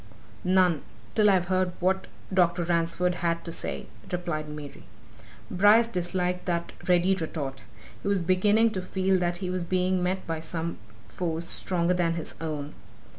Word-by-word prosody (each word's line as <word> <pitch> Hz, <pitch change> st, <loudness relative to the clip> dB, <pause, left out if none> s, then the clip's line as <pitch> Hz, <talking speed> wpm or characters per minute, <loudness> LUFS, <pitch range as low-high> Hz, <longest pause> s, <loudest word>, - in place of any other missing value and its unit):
"None, 180 Hz, -4 st, +3 dB, 0.3 s
till 210 Hz, -1 st, +5 dB
I've 185 Hz, -2 st, +3 dB
heard 185 Hz, 0 st, +1 dB
what 190 Hz, +1 st, +1 dB, 0.3 s
Dr. 175 Hz, -1 st, +3 dB
Ransford 170 Hz, +1 st, +1 dB
had 170 Hz, -1 st, 0 dB
to 170 Hz, -, -4 dB
say," -, -, -3 dB, 0.3 s
replied 170 Hz, -4 st, -2 dB
Mary. 150 Hz, -2 st, -9 dB, 0.7 s
Bryce 205 Hz, +5 st, +6 dB
disliked 180 Hz, -2 st, -1 dB
that 170 Hz, -1 st, -1 dB
ready 180 Hz, +1 st, +4 dB
retort. 155 Hz, -6 st, -4 dB, 0.4 s
He -, -, -5 dB
was 200 Hz, -1 st, +2 dB
beginning 205 Hz, +6 st, +3 dB
to 190 Hz, -, -3 dB
feel 190 Hz, 0 st, +1 dB
that 175 Hz, 0 st, 0 dB
he 180 Hz, -, -2 dB
was 185 Hz, -1 st, -1 dB
being 185 Hz, +1 st, +1 dB
met 185 Hz, +1 st, -1 dB
by 165 Hz, -1 st, -2 dB
some 165 Hz, -1 st, -4 dB, 0.3 s
force 170 Hz, -2 st, -3 dB
stronger 180 Hz, -1 st, +1 dB
than 170 Hz, -2 st, +1 dB
his 165 Hz, -, -3 dB
own. 150 Hz, -2 st, -4 dB
180 Hz, 155 wpm, -27 LUFS, 170-185 Hz, 0.7 s, Bryce